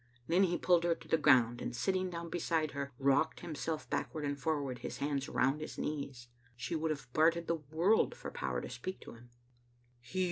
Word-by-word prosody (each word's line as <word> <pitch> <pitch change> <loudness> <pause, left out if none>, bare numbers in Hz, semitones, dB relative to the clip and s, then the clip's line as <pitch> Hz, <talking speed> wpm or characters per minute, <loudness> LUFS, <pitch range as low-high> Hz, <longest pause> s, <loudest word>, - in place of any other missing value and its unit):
Then 170 +6 +3
he 175 -1 0
pulled 175 -2 +4
her 170 -1 +2
to - - -15
the - - +4
ground, 120 -5 +5
and, - - -3
sitting 185 +10 0
down 170 -1 -6
beside 160 -3 0
her, 140 0 -4
rocked 140 +4 +2
himself 155 -1 -3
backward 155 -2 -2
and 145 0 -1
forward, 140 -4 -2
his - - -5
hands 140 -1 -1
round 135 +4 +2
his 155 - -6
knees. 140 -5 -4 0.3
She 120 +7 -3
would 160 0 0
have 135 -5 -4
bartered 165 +2 +4
the 165 -1 -1
world 180 +8 +3
for - - -7
power - - -2
to - - -6
speak 185 - -5
to - - -10
him. 120 +1 -15
155 Hz, 200 wpm, -34 LUFS, 135-170 Hz, 0.3 s, ground